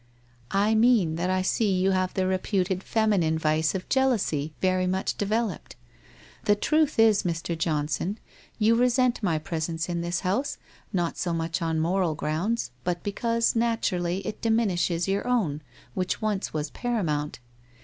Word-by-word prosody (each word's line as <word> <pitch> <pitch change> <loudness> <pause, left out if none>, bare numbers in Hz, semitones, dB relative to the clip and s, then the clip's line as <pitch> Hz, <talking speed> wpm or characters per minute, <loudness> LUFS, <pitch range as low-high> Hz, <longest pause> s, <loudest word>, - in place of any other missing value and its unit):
' 120 -1 -24
I 220 - +2
mean 220 -7 +4
that 180 +2 -1
I 185 0 +1
see 205 +2 +1
you 190 +1 +3
have 185 -1 0
the 190 - +1
reputed 185 0 0
feminine 195 -8 +1
vice 155 +2 +1
of 185 - -4
jealousy 215 - +1
very 185 -1 +1
much 190 +1 -1
developed. 215 -1 -2 0.7
The 205 - +4
truth 305 +7 +1
is, 220 -2 +5
Mr. 170 -1 -2
John 155 -3 0
son, 175 +7 -2 0.4
you 220 +1 +4
resent 250 +1 +2
my 175 -7 +1
presence 160 +1 -3
in 170 -1 -1
this 175 0 -2
house, 205 +10 -1 0.3
not 175 -3 -1
so 175 -2 -1
much 165 +1 -2
on 165 -1 0
moral 170 0 +1
grounds, 165 - -1
but 175 -1 -2
because, 230 +4 0
naturally, 195 -6 0
it 215 - -5
diminishes 195 -7 +1
your 195 +4 -1
own, 185 -13 0 0.3
which 185 -1 -1
once 210 -2 -1
was 150 -1 -3
paramount. 165 -12 -2
185 Hz, 160 wpm, -26 LUFS, 165-220 Hz, 0.7 s, is